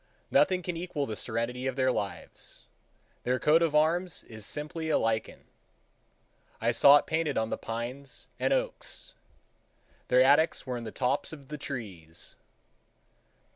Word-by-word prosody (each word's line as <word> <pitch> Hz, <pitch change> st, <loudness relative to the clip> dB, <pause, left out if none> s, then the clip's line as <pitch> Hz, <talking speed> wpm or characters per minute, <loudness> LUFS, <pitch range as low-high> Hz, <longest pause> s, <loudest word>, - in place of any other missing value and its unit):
Nothing 185 Hz, -1 st, +4 dB
can 175 Hz, -1 st, -3 dB
equal 165 Hz, -4 st, -3 dB
the 110 Hz, -, -4 dB
serenity 120 Hz, +4 st, -2 dB
of 130 Hz, -, -2 dB
their 130 Hz, -1 st, +2 dB
lives. 100 Hz, -8 st, -5 dB, 0.6 s
Their 125 Hz, +1 st, +1 dB
coat 155 Hz, +2 st, +4 dB
of 160 Hz, -3 st, +1 dB
arms 165 Hz, +3 st, +2 dB
is 110 Hz, -2 st, -5 dB
simply 155 Hz, +2 st, -3 dB
a 155 Hz, -, +4 dB
lichen. 110 Hz, -1 st, -1 dB, 1.2 s
I 115 Hz, +1 st, +2 dB
saw 140 Hz, +4 st, +8 dB
it -, -, -1 dB
painted 160 Hz, -2 st, 0 dB
on 110 Hz, 0 st, 0 dB
the -, -, +1 dB
pines 120 Hz, +4 st, -5 dB
and -, -, +1 dB
oaks. -, -, -1 dB, 0.9 s
Their 125 Hz, +1 st, +5 dB
attics 145 Hz, +5 st, +4 dB
were 130 Hz, -2 st, -3 dB
in 120 Hz, -, -6 dB
the 110 Hz, -, -5 dB
tops 130 Hz, +2 st, 0 dB
of 140 Hz, -4 st, -11 dB
the 150 Hz, -, -5 dB
trees. 100 Hz, -, -7 dB
135 Hz, 150 wpm, -29 LUFS, 115-160 Hz, 1.2 s, saw